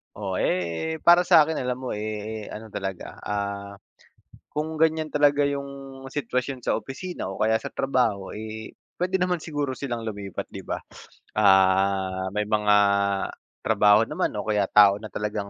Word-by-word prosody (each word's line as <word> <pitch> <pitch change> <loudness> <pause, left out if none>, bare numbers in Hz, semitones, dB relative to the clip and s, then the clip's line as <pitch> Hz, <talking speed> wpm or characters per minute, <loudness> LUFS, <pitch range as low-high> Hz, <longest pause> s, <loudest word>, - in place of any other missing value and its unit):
Oo, 95 -3 -3
eh, 90 - -1
para 175 +1 +6
sa'kin 160 0 +5
alam 125 -1 -2
mo 130 - -3
eh, 110 0 -4
ano 110 0 -9
talaga, 95 -2 -5
ah, 100 -1 -4 0.7
kung 155 +1 -3
ganiyan 160 -1 +2
talaga 145 -1 +4
yung 140 -1 -2 0.4
sitwasyon 125 -1 -3
sa - - +2
opisina 175 - -5
o 95 - -6
kaya 110 +1 +3
sa - - -5
trabaho 120 -8 0
eh, 110 +1 -7 0.2
puwede 180 +2 -1
naman 180 -1 +1
siguro 145 -5 -3
silang 120 -4 -4
lumipat, 100 -3 -5
'di - - -8
ba? - - -3 0.6
Ah, 95 0 +3
may 105 0 0
mga 105 -1 +3 0.9
trabaho 105 +1 +5
naman - - -1
o 105 - -3
kaya 105 -2 +2
tao 100 -1 +6
na 110 0 -8
talagang 105 -1 -3
110 Hz, 150 wpm, -25 LUFS, 100-140 Hz, 0.9 s, para